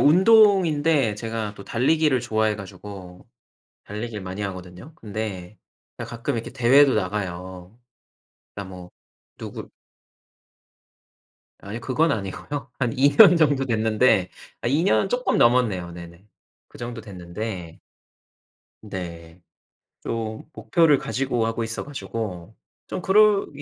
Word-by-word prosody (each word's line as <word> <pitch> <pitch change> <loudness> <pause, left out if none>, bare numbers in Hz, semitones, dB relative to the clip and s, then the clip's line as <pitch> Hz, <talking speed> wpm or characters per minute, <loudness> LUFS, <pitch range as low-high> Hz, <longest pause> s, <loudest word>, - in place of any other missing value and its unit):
운동인데 165 - +4
제가 110 -1 -4
또 100 - -11
달리기를 140 +2 +2
좋아해 110 -3 0
가지고 95 -2 -10 0.6
달리기를 105 0 -6
많이 95 +2 -6
하거든요. 95 - -8
근데 105 -4 -6 0.4
가끔 115 0 -4
이렇게 115 -1 -4
대회도 135 +3 +5
나가요. 95 0 -4 0.8
그냥 100 -2 -7
뭐 90 -1 -11 0.5
누구 - - -8 1.9
아이 105 +4 -7
그건 145 +8 +1
아니고요. 115 +7 -5
한 120 -2 0
2 140 +2 +6
년 190 -6 +9
정도 145 -4 +2
됐는데 110 -4 +2 0.3
아 120 - -1
2 150 +6 +2
년 195 0 +2
쪼끔 250 +3 0
넘었네요. 110 -8 +2
네네. 85 +1 -11 0.5
그 - - -15
정도 120 -1 -6
됐는데 90 -2 -7 1.0
네. 85 -4 -8 0.6
좀 110 -1 -4
목표를 145 +7 +3
가지고 125 -4 -1
하고 115 0 -2
있어 110 +1 -4
가지고 110 - -6 0.3
좀 - - -5
그럴 210 +1 +4
110 Hz, 240 characters per minute, -23 LUFS, 95-135 Hz, 1.9 s, 년